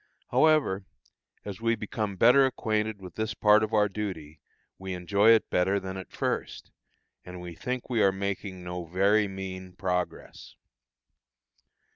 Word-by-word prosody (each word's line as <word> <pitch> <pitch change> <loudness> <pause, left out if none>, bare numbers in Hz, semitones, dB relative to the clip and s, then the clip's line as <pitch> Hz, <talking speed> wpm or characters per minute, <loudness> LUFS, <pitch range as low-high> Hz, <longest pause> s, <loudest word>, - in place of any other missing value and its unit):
However, 150 -12 +3 0.6
as 100 +1 -7
we 115 0 +2
become 105 -1 -4
better 125 +8 +6
acquainted 110 -4 -2
with 90 -3 -10
this 110 0 -3
part 105 0 +5
of 110 0 -1
our 105 -2 +3
duty 95 -7 -6 0.4
we 95 -1 -5
enjoy 100 +4 +3
it 115 -1 +5
better 95 +3 +2
than 95 0 -6
at 95 -1 -8
first, - - -3 0.5
and 90 0 -9
we 90 -1 -8
think 125 +9 -4
we 120 -4 0
are 100 - +5
making 95 -1 -4
no 90 0 -5
very 100 +5 +2
mean 95 -1 -7
progress. 90 -1 -4
100 Hz, 145 wpm, -28 LUFS, 95-110 Hz, 0.6 s, better